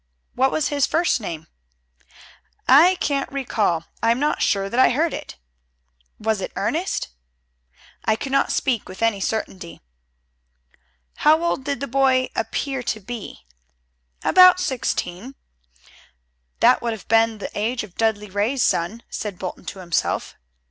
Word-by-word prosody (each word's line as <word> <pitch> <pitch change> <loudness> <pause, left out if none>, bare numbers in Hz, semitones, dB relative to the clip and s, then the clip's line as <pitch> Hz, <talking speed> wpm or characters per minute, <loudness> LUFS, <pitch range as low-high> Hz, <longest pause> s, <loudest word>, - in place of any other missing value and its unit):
"What 265 +2 +2
was 310 - 0
his 285 -2 +1
first 330 -6 +1
name?" 165 -6 -6 1.2
"I 325 +8 +7
can't 280 -5 -2
recall. 215 -11 -1 0.2
I 230 - +2
am 235 +2 +2
not 295 +1 0
sure 195 -1 +1
that 235 +5 -2
I - - +6
heard 315 +6 0
it." - - -7 0.8
"Was 220 -2 -1
it - - -4
Ernest?" 315 - -2 0.9
"I 220 - +2
cannot 275 +4 0
speak 245 -6 -1
with 185 +4 -6
any 225 -3 +2
certainty." 190 -4 -4 1.4
"How 315 +2 +4
old 310 -6 -1
did 280 -3 -2
the 280 - -2
boy 260 0 +2
appear 265 +4 -2
to 220 -3 -3
be?" 210 - -8 0.8
"About 365 -1 +7
sixteen." 255 - -3 1.3
"That - - +5
would 235 -1 -1
have 220 - -10
been 225 0 +3
the 205 - -7
age 230 +3 -1
of 205 -5 -12
Dudley 210 -2 -1
Ray's 220 +6 0
son," 205 +8 0
said 205 -4 -5
Bolton 180 0 -7
to 195 - -6
himself. 175 -3 -2
230 Hz, 140 wpm, -22 LUFS, 205-275 Hz, 1.4 s, I